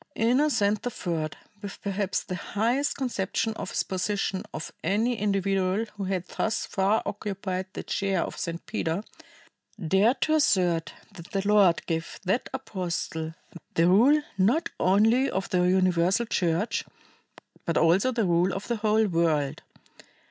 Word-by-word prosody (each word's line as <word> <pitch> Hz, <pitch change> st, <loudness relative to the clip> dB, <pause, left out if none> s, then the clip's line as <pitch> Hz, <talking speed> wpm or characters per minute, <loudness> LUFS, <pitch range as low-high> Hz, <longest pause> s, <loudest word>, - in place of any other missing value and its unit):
Innocent 230 Hz, -4 st, +2 dB
III, 170 Hz, -10 st, -2 dB, 0.3 s
with 200 Hz, -, -7 dB
perhaps 200 Hz, -1 st, -1 dB
the -, -, -6 dB
highest 235 Hz, +10 st, 0 dB
conception 225 Hz, -3 st, -1 dB
of -, -, -6 dB
his -, -, 0 dB
position 190 Hz, 0 st, -2 dB
of 155 Hz, -, -6 dB
any 220 Hz, +8 st, +1 dB
individual 195 Hz, 0 st, 0 dB
who 200 Hz, -2 st, -4 dB
had 185 Hz, -1 st, -2 dB
thus 220 Hz, -, -1 dB
far 200 Hz, +2 st, +1 dB
occupied 195 Hz, -2 st, -4 dB
the -, -, -5 dB
chair 195 Hz, -3 st, 0 dB
of -, -, -6 dB
St. 170 Hz, 0 st, -4 dB
Peter, 165 Hz, +5 st, -2 dB, 0.8 s
dared 200 Hz, -, +3 dB
to 310 Hz, -, +2 dB
assert 180 Hz, -, +2 dB, 0.2 s
that 175 Hz, -3 st, -12 dB
the 195 Hz, 0 st, -2 dB
Lord 200 Hz, -5 st, +4 dB
gave 165 Hz, -1 st, -3 dB
that 195 Hz, +6 st, 0 dB
apostle 170 Hz, -9 st, -4 dB, 0.4 s
the 165 Hz, +1 st, +4 dB
rule 255 Hz, +11 st, +5 dB, 0.2 s
not 245 Hz, -, +2 dB
only 225 Hz, +8 st, +4 dB
of 190 Hz, -, -3 dB
the 180 Hz, -, +2 dB
Universal 185 Hz, +3 st, +2 dB
Church, 180 Hz, 0 st, 0 dB, 0.8 s
but 170 Hz, -, 0 dB
also 180 Hz, +10 st, +4 dB
the 230 Hz, -4 st, 0 dB
rule 175 Hz, +1 st, +2 dB
of 195 Hz, -, -5 dB
the 235 Hz, -, -1 dB
whole 220 Hz, 0 st, +2 dB
world. 165 Hz, -6 st, 0 dB
195 Hz, 140 wpm, -27 LUFS, 180-220 Hz, 0.8 s, rule